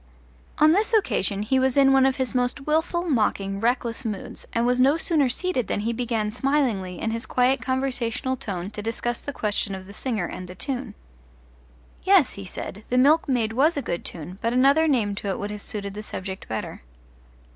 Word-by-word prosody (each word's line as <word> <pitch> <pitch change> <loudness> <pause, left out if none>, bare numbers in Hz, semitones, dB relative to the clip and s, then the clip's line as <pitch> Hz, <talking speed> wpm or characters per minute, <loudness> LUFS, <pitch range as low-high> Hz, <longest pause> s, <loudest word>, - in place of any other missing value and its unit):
On 305 +1 +6
this 425 +6 +3
occasion 205 - +1
he 260 +5 +2
was 260 +1 +1
in 270 -1 +6
one 265 0 +5
of 265 - +1
his 260 -1 -2
most 250 +2 0
wilful, 320 +3 0
mocking, 200 -7 0
reckless 235 +2 0
moods, 210 -4 -5
and 230 +1 +1
was 250 +1 +2
no 275 +5 +5
sooner 315 -5 +2
seated 265 - -1
than - - -1
he 230 +2 -1
began 225 -3 -1
smilingly, 225 - 0
in 225 - -1
his 230 +3 -4
quiet 250 0 +2
conversational 260 0 -1
tone, 195 -5 -5
to 210 - -6
discuss 230 +2 -2
the 285 - -5
question 210 -5 -1
of 190 0 -9
the 200 - -12
singer 220 -5 -2
and 180 +1 -7
the 180 - -10
tune. 245 +3 -4 1.1
Yes, 380 -6 +5
he 200 - -8
said, 190 +3 -7
the 250 - +1
Milkmaid 255 -5 +3
was 295 +7 +3
a - - 0
good 175 - -3
tune, 180 +3 -7
but 230 +1 0
another 275 +5 +4
name 230 -9 +1
to 200 - -4
it 195 - -1
would 205 +1 -4
have 210 -1 -6
suited 200 -2 -4
the 210 - -6
subject 190 -2 -7
better. 110 - -5
240 Hz, 200 wpm, -24 LUFS, 205-270 Hz, 1.1 s, On